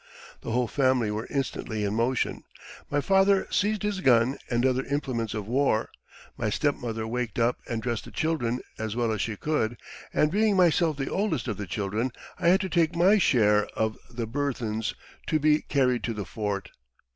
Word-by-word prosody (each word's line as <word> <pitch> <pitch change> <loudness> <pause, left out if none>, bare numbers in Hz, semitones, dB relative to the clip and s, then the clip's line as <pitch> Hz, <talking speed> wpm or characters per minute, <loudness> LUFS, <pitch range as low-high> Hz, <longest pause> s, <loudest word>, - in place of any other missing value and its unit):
The - - -6
whole 120 +1 +1
family 130 -4 +2
were 110 +2 -4
instantly 115 -6 -2
in 100 0 -1
motion: 120 +3 0 0.5
my 145 0 +1
father 195 +2 +4
seized 210 +1 +1
his 205 -2 -1
gun 125 -2 +4
and 120 +1 +1
other 130 0 +2
implements 130 -6 -2
of 105 -2 -4
war; 125 -2 +1 0.5
my 110 - 0
stepmother 115 -3 -1
waked 120 -1 -3
up 120 +1 +2
and 115 -2 -2
dressed 120 -2 -2
the - - -11
children 125 -7 -1 0.2
as 110 -1 -3
well 120 -2 +1
as 110 -2 -1
she 110 - -2
could; 120 -3 -1 0.3
and 150 - +2
being 210 +1 +3
myself 170 -3 +3
the 135 - -3
oldest 190 - -1
of 110 -5 -2
the 105 - -5
children, 105 +7 -2 0.3
I - - +1
had 185 +3 +5
to 190 - -3
take 170 -1 +2
my 190 +5 +5
share 105 - +4
of 110 0 0
the 120 -1 -4
burthens 115 -4 -2 0.3
to 155 - +2
be 155 0 +3
carried 130 -3 +1
to 115 - -2
the 105 -2 -4
fort. 100 0 -3
125 Hz, 185 wpm, -27 LUFS, 110-150 Hz, 0.5 s, had